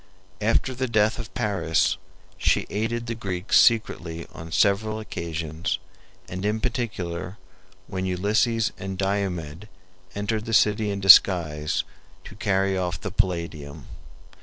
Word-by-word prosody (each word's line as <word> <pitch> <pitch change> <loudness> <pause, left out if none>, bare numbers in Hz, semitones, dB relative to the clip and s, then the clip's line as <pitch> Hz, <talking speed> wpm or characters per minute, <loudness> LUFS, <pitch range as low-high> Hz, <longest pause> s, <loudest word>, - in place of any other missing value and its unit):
After 115 +4 +1
the 130 +1 -2
death 110 0 +2
of 110 -5 -7
Paris 90 -6 +1 0.4
she - - +1
aided 115 +3 -2
the 115 - -3
Greeks 95 -4 +2
secretly 85 -7 +1
on 80 0 -9
several 100 +4 +2
occasions, 85 -4 -3 0.5
and 90 +1 -6
in 105 +2 0
particular 100 -7 -3 0.5
when 95 -1 -4
Ulysses 110 +5 +1
and 95 0 -5
Diomed 95 -3 -2 0.5
entered 105 +2 -2
the 115 - 0
city 105 0 +3
in 100 -1 -3
disguise 85 -6 +5 0.4
to - - -11
carry 95 -3 +1
off 90 -2 -2
the 100 - -5
Palladium. 85 - -2
100 Hz, 125 wpm, -25 LUFS, 85-110 Hz, 0.5 s, disguise